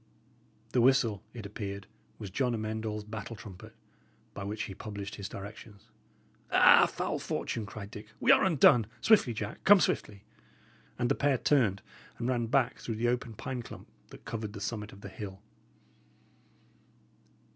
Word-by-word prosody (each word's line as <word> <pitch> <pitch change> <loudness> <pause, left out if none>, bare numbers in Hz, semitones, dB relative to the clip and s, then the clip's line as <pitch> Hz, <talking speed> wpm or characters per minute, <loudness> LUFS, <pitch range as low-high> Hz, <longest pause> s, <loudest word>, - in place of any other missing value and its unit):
The 125 - +3
whistle, 120 -6 +3
it 115 -3 -8
appeared, 100 -1 -6 0.3
was 100 - -7
John 125 +2 0
Amend 110 0 -3
All's 105 0 -3
battle 110 +1 -7
trumpet, 100 -4 -11 0.6
by 100 - -6
which 105 +2 -3
he 100 - -6
published 100 0 -7
his 100 -2 -6
directions. 100 +1 -10 0.6
"Ah, - - +7
foul - - -3
fortune!" 110 -3 -3
cried 105 -1 -8
Dick. 105 -1 -9
"We - - +5
are - - +6
undone. 130 - +5
Swiftly, 195 - +4
Jack, 105 +1 -5
come 205 0 +8
swiftly!" 100 - -1 0.7
And 120 - +1
the - - +3
pair 140 -2 +2
turned 115 -9 +2 0.3
and 120 - -3
ran 120 -2 0
back 130 +1 +1
through 115 - -4
the 120 +2 +1
open 120 -2 -2
pine 125 +4 -4
clump 115 - -11 0.2
that - - -14
covered 110 -2 -4
the 100 - -7
summit 105 0 -4
of 100 - -14
the - - -7
hill. 95 -1 -8
110 Hz, 160 wpm, -30 LUFS, 100-120 Hz, 0.7 s, come